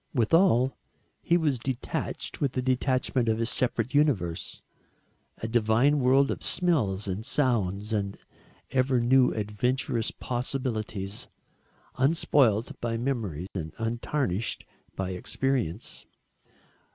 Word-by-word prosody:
Withal 130 Hz, -, +3 dB, 0.5 s
he 170 Hz, -, +3 dB
was 150 Hz, -7 st, 0 dB
detached 130 Hz, 0 st, -4 dB
with 140 Hz, -3 st, +1 dB
the 130 Hz, -, -1 dB
detachment 130 Hz, -1 st, +1 dB
of 110 Hz, -, +2 dB
his 115 Hz, 0 st, -1 dB
separate 120 Hz, 0 st, -1 dB
universe 115 Hz, -, 0 dB, 0.7 s
a 110 Hz, -, -4 dB
divine 120 Hz, +5 st, +3 dB
world 135 Hz, +2 st, +4 dB
of -, -, -4 dB
smells 110 Hz, -, +2 dB
and 95 Hz, +3 st, -3 dB
sounds 105 Hz, -6 st, 0 dB
and 100 Hz, -2 st, -2 dB, 0.5 s
ever 130 Hz, -1 st, +2 dB
new 125 Hz, +2 st, +4 dB
adventurous 110 Hz, +2 st, -1 dB
possibilities, 115 Hz, -6 st, -3 dB, 0.7 s
unspoilt 130 Hz, -6 st, +3 dB
by 115 Hz, -1 st, -1 dB
memory 115 Hz, -, -2 dB
and 80 Hz, -4 st, -5 dB
untarnished 115 Hz, -2 st, -2 dB, 0.3 s
by 95 Hz, -1 st, -3 dB
experience. 115 Hz, 0 st, -2 dB
120 Hz, 105 wpm, -27 LUFS, 105-135 Hz, 0.7 s, world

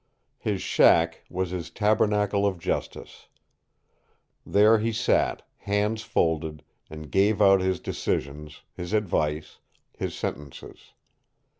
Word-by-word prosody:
His 100 Hz, -3 st, -2 dB
shack 80 Hz, 0 st, +3 dB
was 95 Hz, -1 st, -3 dB
his 90 Hz, -3 st, -5 dB
tabernacle 105 Hz, -1 st, +1 dB
of 95 Hz, -2 st, -2 dB
justice. 85 Hz, -, -5 dB, 1.2 s
There 110 Hz, +2 st, +4 dB
he 115 Hz, +2 st, -1 dB
sat, 110 Hz, -, 0 dB
hands 105 Hz, +2 st, -1 dB
folded, 80 Hz, -6 st, -1 dB, 0.3 s
and 80 Hz, -1 st, -10 dB
gave 100 Hz, +2 st, +2 dB
out 95 Hz, -2 st, +5 dB
his 95 Hz, -1 st, 0 dB
decisions, 75 Hz, +2 st, -4 dB
his 90 Hz, +3 st, -7 dB
advice, 75 Hz, -7 st, -1 dB, 0.4 s
his -, -, -4 dB
sentences. 75 Hz, -2 st, -7 dB
95 Hz, 110 wpm, -26 LUFS, 80-105 Hz, 1.2 s, out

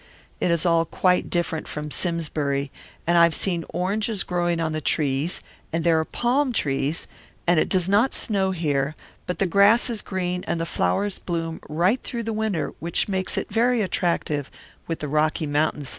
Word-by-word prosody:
It -, -, +1 dB
is 170 Hz, 0 st, +1 dB
all 165 Hz, -1 st, +4 dB
quite 180 Hz, +3 st, +1 dB
different 170 Hz, -2 st, -1 dB
from 150 Hz, 0 st, -5 dB
Simsbury, 145 Hz, -5 st, -1 dB, 0.3 s
and 170 Hz, 0 st, +4 dB
I -, -, +7 dB
have 170 Hz, -1 st, +4 dB
seen 175 Hz, -4 st, 0 dB
oranges 205 Hz, +3 st, -1 dB
growing 175 Hz, -1 st, 0 dB
on 160 Hz, -1 st, 0 dB
the 155 Hz, 0 st, -2 dB
trees, 145 Hz, +3 st, 0 dB, 0.3 s
and 165 Hz, 0 st, -1 dB
there 165 Hz, -1 st, +4 dB
are 160 Hz, -, 0 dB
palm 255 Hz, -, +1 dB
trees, 140 Hz, -3 st, 0 dB, 0.4 s
and 175 Hz, -2 st, +4 dB
it -, -, +1 dB
does 185 Hz, -2 st, +2 dB
not 205 Hz, +7 st, +3 dB
snow 195 Hz, -3 st, +1 dB
here; 150 Hz, -5 st, 0 dB, 0.3 s
but 180 Hz, -, -2 dB
the 195 Hz, -, +2 dB
grass 200 Hz, +7 st, +5 dB
is 225 Hz, -, -3 dB
green 180 Hz, -1 st, -2 dB
and 170 Hz, -, -1 dB
the 165 Hz, -, -1 dB
flowers 175 Hz, -, 0 dB
bloom 165 Hz, -2 st, -3 dB
right 180 Hz, -, +2 dB
through 235 Hz, -1 st, -4 dB
the 225 Hz, 0 st, -2 dB
winter, 215 Hz, -5 st, -1 dB
which 170 Hz, +1 st, 0 dB
makes 190 Hz, -2 st, -2 dB
it -, -, -3 dB
very 235 Hz, 0 st, +3 dB
attractive 170 Hz, -6 st, -1 dB, 0.4 s
with 165 Hz, -, -3 dB
the 150 Hz, -, -2 dB
Rocky 155 Hz, +2 st, +1 dB
Mtns. 145 Hz, -1 st, 0 dB
170 Hz, 185 wpm, -24 LUFS, 155-195 Hz, 0.4 s, I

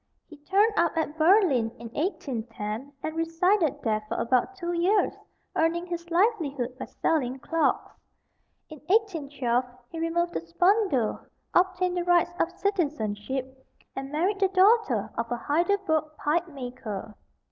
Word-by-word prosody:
He 310 Hz, -, -14 dB
turned 395 Hz, +9 st, +2 dB
up 340 Hz, -1 st, +2 dB
at 315 Hz, -1 st, -1 dB
Berlin 320 Hz, -, +4 dB
in 235 Hz, 0 st, -8 dB
1810, 235 Hz, -, -4 dB
and 315 Hz, -, -3 dB
resided 330 Hz, -2 st, +1 dB
there 215 Hz, -2 st, +1 dB
for -, -, -3 dB
about 255 Hz, +10 st, +1 dB
two 350 Hz, -2 st, -3 dB
years, 360 Hz, +5 st, +2 dB, 0.4 s
earning 335 Hz, +2 st, +1 dB
his 345 Hz, -1 st, -6 dB
livelihood 325 Hz, -, +1 dB
by -, -, -4 dB
selling 265 Hz, -5 st, -1 dB
clocks. 325 Hz, +4 st, 0 dB, 0.7 s
In 310 Hz, -2 st, -11 dB
1812 285 Hz, -, +1 dB, 0.3 s
he 330 Hz, -, -6 dB
removed 340 Hz, +1 st, 0 dB
to -, -, -2 dB
Spandau, 320 Hz, -, +2 dB, 0.3 s
obtained 365 Hz, 0 st, +2 dB
the 350 Hz, -, 0 dB
rights 350 Hz, 0 st, +3 dB
of 330 Hz, -, +2 dB
citizenship, 265 Hz, -, -2 dB, 0.3 s
and 270 Hz, +1 st, -5 dB
married 365 Hz, +7 st, 0 dB
the 390 Hz, -, +4 dB
daughter 375 Hz, -, +3 dB
of 230 Hz, 0 st, -3 dB
a 240 Hz, -, 0 dB
Heidelberg 330 Hz, +3 st, +1 dB
pipemaker. 255 Hz, -, -3 dB
320 Hz, 135 wpm, -27 LUFS, 255-360 Hz, 0.7 s, Berlin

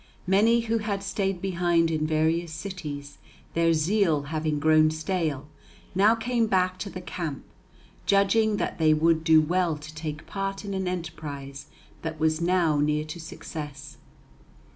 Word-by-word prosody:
Many 215 Hz, +5 st, +4 dB
who 230 Hz, 0 st, 0 dB
had 200 Hz, -2 st, -3 dB
stayed 195 Hz, -2 st, -2 dB
behind 175 Hz, -3 st, +2 dB
in 155 Hz, -1 st, 0 dB
various 160 Hz, +2 st, +1 dB
cities, 155 Hz, -5 st, -7 dB, 0.3 s
their 165 Hz, 0 st, +3 dB
zeal 165 Hz, -1 st, +2 dB
having 155 Hz, 0 st, -2 dB
grown 155 Hz, +1 st, +5 dB
stale, 155 Hz, -3 st, -2 dB, 0.5 s
now 205 Hz, +5 st, +5 dB
came 230 Hz, 0 st, 0 dB
back 185 Hz, -2 st, +1 dB
to 205 Hz, -, -4 dB
the 185 Hz, -, -7 dB
camp, 165 Hz, -6 st, -5 dB, 0.6 s
judging 205 Hz, +2 st, +3 dB
that -, -, -3 dB
they 155 Hz, -1 st, +5 dB
would 160 Hz, +1 st, +2 dB
do 160 Hz, 0 st, +6 dB
well 170 Hz, 0 st, +1 dB
to 155 Hz, +1 st, -10 dB
take 155 Hz, -1 st, -6 dB
part 195 Hz, 0 st, -4 dB
in 200 Hz, -, -4 dB
an 190 Hz, -1 st, -2 dB
enterprise 150 Hz, -6 st, -6 dB, 0.3 s
that 160 Hz, -1 st, -5 dB
was 160 Hz, +1 st, +1 dB
now 170 Hz, -4 st, +2 dB
near 150 Hz, +1 st, +1 dB
to 155 Hz, +3 st, -7 dB
success. 150 Hz, -3 st, -8 dB
165 Hz, 150 wpm, -26 LUFS, 155-195 Hz, 0.6 s, do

